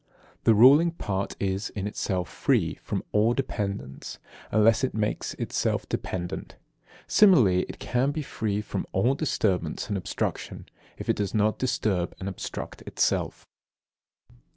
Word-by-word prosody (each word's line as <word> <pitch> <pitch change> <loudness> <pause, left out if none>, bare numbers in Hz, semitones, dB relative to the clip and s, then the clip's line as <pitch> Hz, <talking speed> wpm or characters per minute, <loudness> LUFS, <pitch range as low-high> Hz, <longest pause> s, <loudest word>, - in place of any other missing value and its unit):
The 115 - +6
ruling 140 +10 +7
part 100 - -3
is, 95 +1 -1
in 100 -2 -5
itself, 95 -3 -2
free - - +1
from - - -3
all 110 +3 +3
dependence, 100 - -4 0.3
unless 110 +3 +4
it 130 - -1
makes 105 -1 -2
itself - - -1
dependent. 90 -1 -4 0.5
Similarly, 125 - +5
it - - -8
may 125 +2 +3
be 150 +2 -2
free 105 -5 -2
from 100 -2 -4
all 120 +8 +3
disturbance 100 - -1
and 100 - 0
obstruction, 90 - -4 0.3
if - - -7
it - - +1
does 100 0 -2
not 105 0 +2
disturb 100 -8 0
and 95 - -5
obstruct 95 - -6
itself. - - 0
105 Hz, 135 wpm, -26 LUFS, 95-120 Hz, 0.5 s, ruling